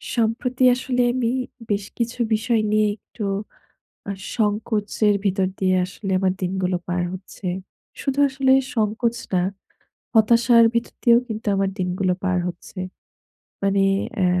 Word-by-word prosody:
সম্প্রতি 245 +3 0
আসলে 250 -1 -1
আমি 250 -2 0 0.4
বেশ 200 -1 0
কিছু 235 +1 -2
বিষয় 220 +1 +1
নিয়ে 215 0 +3
একটু 215 0 -10 0.9
আ - - 0 0.3
সংকোচের 210 -1 +1
ভিতর 190 -1 +2
দিয়ে 185 -1 +2
আসলে 190 +2 -6
আমার 185 -1 +2
দিনগুলো 185 0 0
পার 175 0 0
হচ্ছে। 185 +1 -10 0.6
শুধু 275 0 -1
আসলে 265 0 +1 0.2
সংকোচ 225 +2 0 0.2
না। 180 - +3 0.7
হতাশার 230 +1 +6
ভিতর 235 - -1
দিয়েও 235 -1 +6
কিন্তু 220 0 -5
আমার 195 0 +1
দিনগুলো 180 0 0
পার 185 -1 +1
হচ্ছে। 180 +2 -8 0.8
মানে 195 0 +2 0.4
এ - - +4
215 Hz, 130 wpm, -22 LUFS, 190-235 Hz, 0.9 s, হতাশার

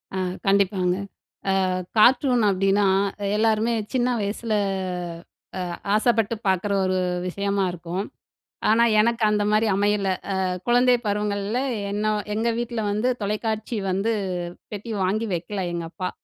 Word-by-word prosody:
அ - - -1 0.3
கண்டிப்பாங்க. 195 -2 +2 0.7
அ - - -1 0.3
கார்ட்டூன் 245 +1 +5
அப்படின்னா, 195 +1 +2 0.5
எல்லாருமே 220 +1 +2 0.2
சின்ன 250 -1 +1
வயசுல 215 +2 -2 1.1
அ - - -4 0.2
ஆசைப்பட்டு 225 0 +2
பார்க்குற 190 +2 +1
ஒரு 185 0 +1 0.3
விஷயமா 200 +1 -1
இருக்கும். 175 +3 -4 0.7
ஆனா, 225 +2 +5 0.2
எனக்கு 230 +1 +2
அந்த 210 0 +1
மாரி 215 +1 +3
அமையல. 205 -1 +1 0.2
அ - - -1 0.3
குழந்தை 245 +1 +5
பருவங்கள்ல 205 +2 -1 0.3
என்னோ 215 +1 0 0.2
எங்க 225 +2 0
வீட்ல 235 -1 -3
வந்து 215 +5 +1
தொலைக்காட்சி 215 +2 -2
வந்து 205 +5 0 0.6
பெட்டி 215 +2 -5
வாங்கி 215 +5 0
வைக்கல 180 +4 -3
எங்கப்பா. 170 +2 -4
210 Hz, 120 wpm, -24 LUFS, 195-225 Hz, 1.1 s, கார்ட்டூன்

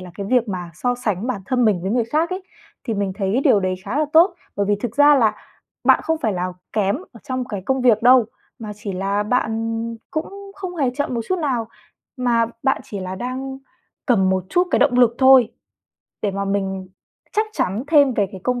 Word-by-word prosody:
là 180 -1 -9
cái 200 0 -5
việc 240 0 +2
mà 180 -3 -5
so 245 +7 -1
sánh 215 -4 -2
bản 245 -7 -3
thân 250 -1 +1
mình 200 -6 +2
với 190 - -2
người 240 0 +1
khác 310 +9 0
ấy, 370 +1 -4 0.4
thì 230 -4 -2
mình 200 -2 -1
thấy 200 +5 0
điều 205 - +5
đấy 185 0 -1
khá 280 - -2
là 305 - +3
tốt. 345 +3 +6 0.2
Bởi 200 -1 0
vì 205 - +2
thực 230 +3 -5
ra 290 0 +7
là 220 -6 +3 0.5
bạn - - +5
không 320 0 -1
phải 220 -9 0
là 180 0 -3 0.2
kém 205 +1 +1 0.2
ở 230 - -14
trong 255 -3 -3
cái 205 -6 -6
công 265 -1 +1
việc 230 -3 +3
đâu, 250 -1 +6 0.3
mà 215 -2 -6
chỉ 205 -1 -6
là 195 +2 -1
bạn 225 0 -1 0.3
cũng 395 +5 -5
không 370 -2 -6
hề 275 -6 +1
chậm 285 -3 -1
một 235 - -1
chút 370 - 0
nào, 250 -8 -1 0.5
mà 235 -2 +2 0.2
bạn 265 - +1
chỉ 200 - -6
là 185 0 -5
đang 260 +5 -5 0.5
cần 190 -7 +3
một 185 -1 0
chút 355 +1 +2
cái - - +3
động 275 - +3
lực 240 -2 +5
thôi. 260 -3 +6 0.7
Để 205 - +1
mà 200 +1 -3
mình 195 -1 -2 0.4
chắc 430 +1 +1
chắn 200 - -1
thêm 285 -4 +4
về 205 -3 +1
cái 190 - -8
công 250 -1 0
230 Hz, 225 wpm, -21 LUFS, 200-265 Hz, 0.7 s, ra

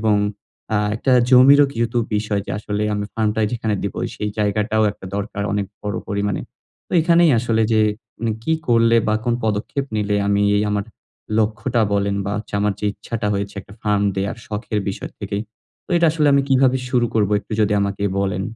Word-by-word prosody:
এবং 110 -1 +3 0.6
আ - - +3 0.2
একটা 130 +3 +1 0.2
জমিরও 140 +3 +8
কিন্তু 115 0 -1 0.2
বিষয় 105 -1 -1
যে - - -5
আসলে 105 0 -3
আমি 105 0 -2
ফার্মটা 110 0 0
যেখানে 110 -3 -1
দিব, 100 - -3 0.2
সেই 105 0 -3
জায়গাটাও 105 +1 +1
একটা 95 - -12
দরকার 100 0 -3
অনেক 100 -1 -1 0.2
বড় 105 -1 -3
পরিমাণে। 100 0 -1 0.5
তো - - -13
এখানেই 170 0 +4
আসলে 115 -1 +1
যে 110 - +4 0.4
মানে 115 -1 -1
কি 160 - +1 0.2
করলে 115 0 +4
বা, 110 - +2
কোন 120 -1 +1
পদক্ষেপ 110 +6 -1
নিলে 105 -1 0
আমি 100 0 +2
এই 105 - +2
আমার 105 -1 -1 0.5
লক্ষ্যটা 115 +2 0
বলেন 100 0 0
বা, 100 - -2
হচ্ছে 105 - -8
আমার 105 0 +2
যে 105 - -1
ইচ্ছাটা 115 0 -5
হয়েছে 100 +1 -3
একটা 100 +1 -15
ফার্ম 105 -1 +1
দেয়ার 100 +3 -2
শখের 105 0 -3
বিষয় 95 - -5
থেকে। 100 - -4 0.5
তো - - -20
এটা 170 - +4
আসলে 155 -2 +1
আমি 140 - +4
কিভাবে 130 -1 +4
শুরু 120 -2 +2
করবো? 105 -2 +2
একটু - - -12
যদি 105 0 +1
আমাকে 100 0 -2 0.2
বলেন। 95 -1 -1
105 Hz, 190 wpm, -20 LUFS, 100-115 Hz, 0.6 s, জমিরও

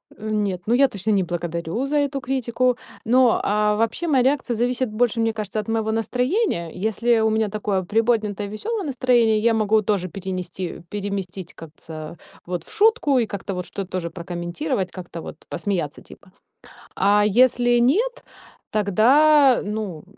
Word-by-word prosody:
Э, 215 +1 -7
нет, 200 -4 -1
ну 230 - +1
я 275 +2 +5
точно 210 -2 -3
не 195 -2 +3
благодарю 170 +6 -3
за 295 +1 0
эту 280 -1 0
критику. 250 -1 0 0.3
Но, 250 0 +4
а, 210 +1 +2
вообще, 230 +10 -1
моя 265 -5 +3
реакция 265 -3 +1
зависит 245 +1 0
больше, 230 +1 0
мне 225 -1 +1
кажется, 215 -1 -4
от 215 - -5
моего 220 -1 0
настроения. 250 - 0
Если 220 +4 +1
у 220 0 +2
меня 220 -1 +1
такое 200 -2 -1
приподнятое, 215 -1 0
весёлое 410 - -4
настроение, 240 -5 +2
я 230 +1 +3
могу 215 0 +2
тоже 195 -3 -1
перенести 185 -1 -5
переместить 195 -3 -5
как 165 -2 -11
ца 155 +1 -9 0.3
вот 175 -2 -4
в - - -13
шутку 420 - +3
и 230 - +2
как-то 200 -1 -5
вот 180 -1 -4
что-то 195 -2 -6
тоже 175 -2 -3
прокомментировать, 175 - -4
как-то 175 -3 -8
вот - - -8
посмеяться 170 -6 -3
типа. 185 - -16 0.6
А 205 +1 +3
если 240 +2 +4
нет, 410 - +1 0.5
тогда, 260 +7 +4
ну, 205 -6 -4
215 Hz, 160 wpm, -22 LUFS, 190-245 Hz, 0.6 s, я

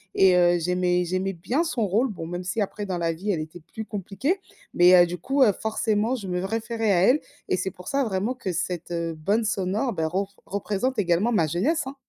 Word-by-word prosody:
et 190 -1 +5
heu, 175 0 +4
j'aimais 180 +1 +1
j'aimais 185 +2 -1
bien 240 - -1
son 245 -9 -1
rôle- 220 +8 +2
bon 165 -5 -6
même 175 +2 -5
si 190 +4 -2
après 205 +1 -3
dans 185 - -2
la 165 -1 0
vie 195 +6 -2
elle 170 - -1
était 160 +3 -8
plus 220 - -5
compliquée- 210 - -2 0.3
mais, 180 +1 +7
heu, - - +6
du 175 +1 -5
coup, 270 - +2
heu, 215 - +6
forcément 220 +2 0
je 205 -6 -6
me 180 0 -2
référais 225 +1 -1
à 175 -3 +3
elle 265 +8 +5 0.3
et - - +1
c'est 190 - -2
pour 180 0 -13
ça 275 0 +1
vraiment 210 +2 -1
que 250 -7 -4
cette, 175 0 -3
heu, 170 -1 -2
bande 200 +9 0
sonore, 205 +4 -1
beh, 160 -3 -1
ror 190 +5 -2
représente 210 +6 -2
également 190 +4 +2
ma 170 -8 +3
jeunesse, 220 - 0
hein. 275 - -6
195 Hz, 230 wpm, -25 LUFS, 175-225 Hz, 0.3 s, mais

